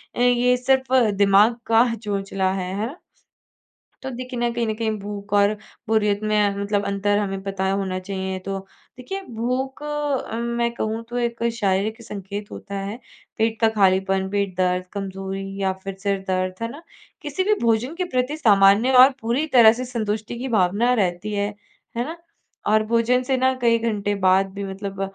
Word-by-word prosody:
अ, - - -5
ये 245 0 +4
सिर्फ 260 +1 +1 0.3
दिमाग 205 +4 +5
का 230 +1 +4
चोचला 195 -3 -2
है, 185 -1 -3
है 215 - 0
ना? 295 +7 -10 1.0
तो 265 - -4
देखिए 250 0 -6
ना, 240 - +1
कहीं 235 0 -1
न 215 - 0
कहीं 220 0 -1
भूख 205 0 -7
और 205 +1 +4 0.3
बोरियत 210 -2 +2
में 210 -1 +2
मतलब 200 0 -1
अंतर 200 +1 +1
हमें 195 -2 -2
पता 195 -1 -2
होना 190 -1 -1
चाहिए। 190 0 -4
तो 195 +1 -4 0.4
देखिए, 385 +11 -5
भूख 255 +2 -3
अ, 295 -5 -2
मैं 235 0 -1
कहूँ 220 0 -3
तो 245 - -4
एक 235 -1 -2
शारीरिक 215 +1 0
संकेत 205 -1 -7
होता 200 - -7
है, 200 +3 -5 0.4
पेट 225 0 0
का 225 - +5
खालीपन, 190 -1 +2
पेट 200 -2 -1
दर्द, 180 0 +1
कमज़ोरी 195 0 -5
या 190 -1 +1
फिर 195 -1 -5
सिर 200 -1 0
दर्द, 185 0 0
है 230 - -1
ना। 295 +6 -11 0.4
किसी 300 +4 -2
भी 425 +3 +3
भोजन 235 +6 +1
के 365 - -1
प्रति 255 +5 0
सामान्य 205 -1 +5
और 265 - +6
पूरी 240 +7 0
तरह 225 -2 +9
से 255 +2 -5
संतुष्टि 220 -1 -3
की 260 - -3
भावना 205 +7 +2
रहती 195 -2 -1
है, 205 0 0 0.5
है 240 - 0
ना। 325 +4 -6 0.5
और 215 +1 +4
भोजन 235 +3 +2
से 265 +1 0
ना 260 +1 +3
कई 230 -1 +4
घंटे 210 -3 -1
बाद 190 +1 +4
भी 200 0 -5
मतलब 195 0 -6
215 Hz, 180 wpm, -22 LUFS, 195-240 Hz, 1.0 s, तरह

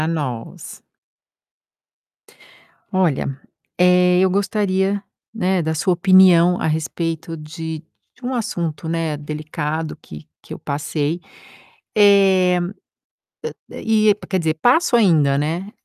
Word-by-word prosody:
Pra - - -1
nós. 140 -8 -5 2.1
Olha, 155 -7 0 0.4
eh, 180 0 +4
eu 190 - +3
gostaria, 200 0 0 0.3
né, 190 -4 0
da 160 0 -1
sua 180 +4 +1
opinião 180 -1 +5
a - - -1
respeito 165 +1 -3
de 160 +1 -7 0.3
de 250 - -13
um 260 - -2
assunto, 170 -9 -3
né, 165 -2 -1
delicado 155 +1 -4
que 75 0 -11 0.2
que - - -9
eu - - -9
passei. 150 +3 -3 0.7
Eh, 195 -3 +5 1.1
a - - -11
a - - -7
e 215 -2 +3
quer 190 - 0
dizer, 160 -2 0
passo 245 - +3
ainda, 160 -11 +3
né. 165 +7 -2
170 Hz, 115 wpm, -20 LUFS, 155-190 Hz, 2.1 s, opinião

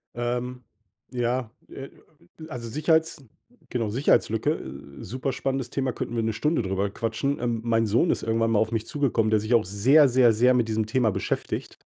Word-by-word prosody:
Ähm, 125 +1 -3 0.5
ja, 125 -1 -1 0.2
äh, 135 0 -8 0.6
also, 120 -4 -7
Sicherheits 160 +2 +1 0.5
genau, 115 -4 -2
Sicherheitslücke, 115 +1 +2
äh, 70 - -8
superspannendes 130 +2 -3
Thema, 130 0 -1
könnten 120 - -5
wir 115 - 0
'ne 110 0 -1
Stunde 150 +8 0
drüber 95 0 -1
quatschen. 115 +6 -2
Ähm, 120 -2 -2
mein 115 -1 +2
Sohn 115 - +2
ist - - -2
irgendwann 115 0 +1
mal 110 - +3
auf 110 +1 0
mich 115 -1 -2
zugekommen, 120 -6 0
der 110 - +4
sich 110 +3 -2
auch 115 -2 +4
sehr, 130 +10 +5
sehr, 120 -2 +5
sehr 125 +4 +4
mit 120 -2 +1
diesem 110 0 -1
Thema 115 0 +1
beschäftigt. - - -4
120 Hz, 175 wpm, -25 LUFS, 110-130 Hz, 0.6 s, sehr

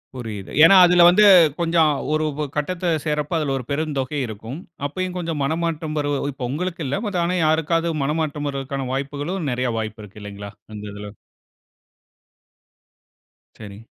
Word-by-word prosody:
புரியுது. 110 -6 -7
ஏன்னா 180 +4 +8
அதில 175 0 +5
வந்து 210 +4 +5 0.3
கொஞ்சம், 165 -2 +3 0.2
ஒரு 155 0 +1
உ 150 +1 -3
கட்டத்த 175 +4 -2 0.2
சேர்றப்ப 150 +2 -1
அதில 145 -3 -1
ஒரு 125 - -6
பெருந்தொகை 145 -2 -2
இருக்கும். 110 +6 -8 0.3
அப்பயும் 185 +4 -4
கொஞ்சம் 165 -4 -3
மனமாத்தம் 160 +1 -2
வருவ 145 0 -1 0.3
உங்களுக்கு 170 +4 -3
இல்ல. 140 - -1
மத்த 180 -4 -1
ஆனா 180 +1 0
யாருக்காவது 165 +2 +1
மனமாற்றம் 150 0 -2
வருவதுக்கான 135 -1 -4
வாய்ப்புகளும் 145 +5 -3
நெறைய 125 0 -1
வாய்ப்பு 110 0 -5
இருக்கு 105 +1 -13
இல்லங்களா? 100 0 -8 0.2
அந்த 105 -1 -8
இதுல. 105 0 -8 2.5
சரி. 105 -1 -10
150 Hz, 140 wpm, -22 LUFS, 130-165 Hz, 2.5 s, ஏன்னா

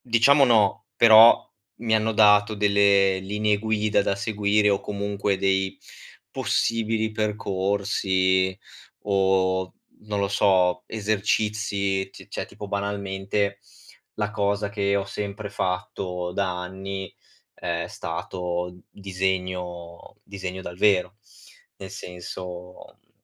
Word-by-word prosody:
Diciamo 130 +4 +4
no, 110 -5 +2
però 115 0 +8 0.3
mi 115 -1 +1
hanno 110 +1 +1
dato 105 0 +5
delle 100 -2 +3
linee 105 +2 0
guida 110 -1 +1
da 100 - -1
seguire 105 0 +1
o 100 - +1
comunque 100 -1 -2
dei 95 0 0 0.5
possibili 110 -1 0
percorsi 95 -2 0 0.4
o, 95 -2 +1 0.3
non 105 -1 -2
lo 100 - 0
so, 95 -3 +2
esercizi. 105 -2 -1
C - - -14
cioè - - -5
tipo, 105 - -10
banalmente, 100 0 -2 0.6
la 105 -1 -1
cosa 100 0 -1
che 100 -1 0
ho 100 - -1
sempre 100 +1 -5
fatto 90 -1 -3
da 95 -2 -1
anni 95 +1 -6 0.4
è - - -3
stato 90 +1 -5
disegno 90 -3 -4
disegno 95 -1 -7
dal 85 -1 -8
vero. 95 -2 +2 0.6
Nel 95 -1 -9
senso, 90 0 -9
mhmm, - - -41
100 Hz, 110 wpm, -24 LUFS, 95-105 Hz, 0.6 s, però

